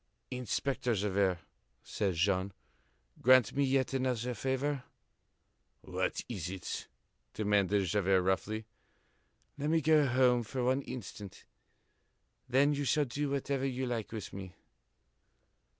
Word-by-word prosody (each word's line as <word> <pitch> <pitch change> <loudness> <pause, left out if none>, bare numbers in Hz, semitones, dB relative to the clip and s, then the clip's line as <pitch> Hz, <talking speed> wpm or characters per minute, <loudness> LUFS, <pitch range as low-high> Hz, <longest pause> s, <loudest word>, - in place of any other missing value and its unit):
"Inspector 125 0 -1
Javert," 100 -2 +1 0.5
said 95 +7 -1
Jean, 95 +2 +1 0.7
"grant 130 -3 +6
me 140 - +3
yet 135 -1 +1
another 125 -2 0
favor." 135 +3 -1 1.0
"What - - -2
is 95 -8 -4
it?" 95 -2 -5 0.5
demanded 100 -2 +2
Javert 95 0 +2
roughly. 105 +4 -1 0.9
"Let 145 +2 -1
me 165 +1 +4
go 155 -1 +4
home 125 -1 +4
for 125 +3 -3
one 130 +2 +2
instant. 105 -7 -8 1.0
Then 140 +3 +4
you 145 0 -1
shall 145 +2 +2
do 140 +3 -2
whatever 140 -1 -1
you 130 0 -2
like 120 -4 -3
with 110 -3 -6
me." 95 -2 -8
125 Hz, 120 wpm, -32 LUFS, 100-135 Hz, 1.0 s, grant